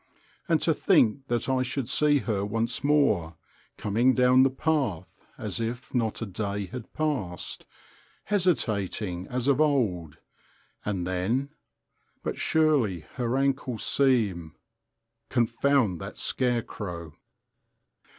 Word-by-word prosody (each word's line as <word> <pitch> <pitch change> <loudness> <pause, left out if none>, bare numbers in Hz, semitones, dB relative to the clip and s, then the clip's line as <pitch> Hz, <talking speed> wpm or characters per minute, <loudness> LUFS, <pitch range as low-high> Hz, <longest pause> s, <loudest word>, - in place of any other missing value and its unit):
And - - +4
to - - +3
think 130 +5 +2
that 120 0 -1
I 130 -1 +1
should 130 -1 -2
see 145 +2 +3
her 105 -3 -1
once 115 +4 -2
more, 135 - +2 0.4
coming 120 +5 +2
down 125 0 +5
the 135 - +5
path 130 - -2
as - - -4
if 120 +3 -4
not 115 -2 -1
a - - -2
day 100 0 -3
had 110 +5 -8
passed, 135 - -3 0.6
hesitating 105 - 0
as 125 0 -2
of 140 +1 +3
old, 105 - +1 0.7
and 95 -4 -2
then—but 115 +11 -5
surely 145 - +2 0.2
her 125 0 0
ankles 135 -3 0
seem—Confound 115 - 0
that - - -7
scarecrow!... 105 - -2
120 Hz, 110 wpm, -27 LUFS, 100-135 Hz, 0.7 s, down